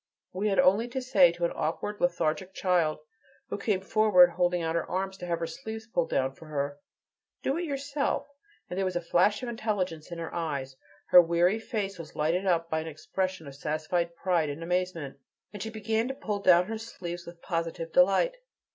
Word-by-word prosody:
We 195 +3 -1
had 195 - +1
only 205 +6 +4
to 245 +2 -3
say 200 -9 +5
to 170 0 -2
an - - 0
awkward, 205 +7 -3
lethargic 190 -7 0
child, 175 -5 +1 0.5
who - - -3
came 200 -4 0
forward 195 -3 +5
holding 175 0 +1
out 160 0 -1
her 170 -1 -1
arms 190 +1 -2
to 180 - -7
have 170 -1 0
her 165 - -2
sleeves 220 +7 -7
pulled 175 -7 -1
down 135 0 0
for 160 +2 -14
her: 145 -1 -3 0.6
"Do 270 - +1
it 350 - -2
yourself," 280 -1 -1 0.4
and 180 - -4
there - - +1
was 185 -1 -2
a 175 - 0
flash 185 +7 +2
of 245 - -3
intelligence 195 -8 -2
in 170 - -5
her 165 -1 -5
eyes, 140 -6 -3 0.3
her 180 - +10
weary 175 +5 +2
face 200 -5 -3
was 160 -2 -9
lighted 170 +6 0
up 165 -2 +2
by 160 -1 -1
an 160 - -5
expression 185 +3 -3
of 140 - -9
satisfied 155 +4 -2
pride 170 -3 +1
and 145 +3 -5
amazement, 170 -5 -2 0.3
and 205 - -7
she 220 - -3
began 220 +1 -1
to 265 - -4
pull 210 -6 -3
down 180 -2 +5
her 220 +2 -4
sleeves 175 -6 -7
with 170 0 -10
positive 165 -1 -3
delight. 195 - +4
180 Hz, 200 wpm, -28 LUFS, 165-205 Hz, 0.6 s, her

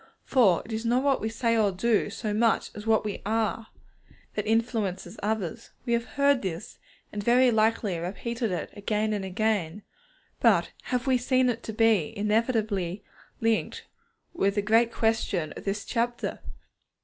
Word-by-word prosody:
For 205 -10 +3
it 225 - -7
is 220 +1 -2
not 245 +3 +2
what 280 -1 +2
we 220 - -1
say 230 +1 0
or 215 -3 +3
do, 210 +3 +1
so 215 0 -3
much 225 +2 +2
as 210 +1 -9
what 220 -1 +3
we 210 - -4
are, 220 +1 -1 0.7
that 210 0 -3
influences 225 -4 -1
others. 215 0 -3 0.2
We 235 - 0
have 235 0 +1
heard 280 -1 +4
this, 185 0 -5 0.3
and 205 -1 -4
very 245 +3 +5
likely 215 -4 +1
repeated 225 +6 -3
it 180 - -3
again 215 +1 -1
and 205 -2 -2
again, 200 -2 -1 0.6
but - - +3
have 250 0 -1
we 260 -2 +3
seen 255 0 +2
it 230 0 -6
to - - -4
be 220 -8 +2
inevitably 210 -3 0 0.4
linked 225 -1 0 0.5
with 200 - +1
the 205 - 0
great 225 +2 +3
question 210 -9 0
of - - -9
this 200 +1 -2
chapter? 240 0 -2
220 Hz, 160 wpm, -27 LUFS, 205-235 Hz, 0.7 s, very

